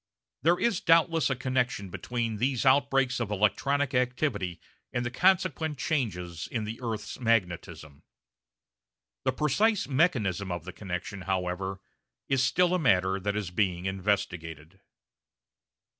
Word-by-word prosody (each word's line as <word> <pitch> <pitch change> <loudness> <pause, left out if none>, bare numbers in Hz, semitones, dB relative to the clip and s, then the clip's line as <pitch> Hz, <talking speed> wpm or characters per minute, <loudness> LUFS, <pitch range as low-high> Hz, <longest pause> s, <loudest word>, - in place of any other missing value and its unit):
There 170 +6 +3
is 235 -3 +1
doubtless 165 -2 +4
a 135 - 0
connection 125 -7 -1
between 115 +1 -3
these 130 +3 0
outbreaks 135 -1 +3
of 115 -3 -2
electronic 140 +7 +1
activity 125 - 0 0.3
and 120 0 -2
the 120 - -2
consequent 165 -2 +2
changes 90 - -2
in 115 -3 -2
the 110 +2 -6
earth's 115 -1 -4
magnetism. 85 - -1 1.2
The 130 - +3
precise 195 - +2
mechanism 115 - +1
of 85 -2 -4
the - - -7
connection, 95 +1 -5
however, 95 +1 -2 0.5
is 135 -2 +2
still 180 +6 +3
a 185 - +2
matter 95 - +2
that 100 +1 -2
is 100 -4 -3
being 90 -2 0
investigated. 90 -4 -2
115 Hz, 130 wpm, -28 LUFS, 95-135 Hz, 1.2 s, doubtless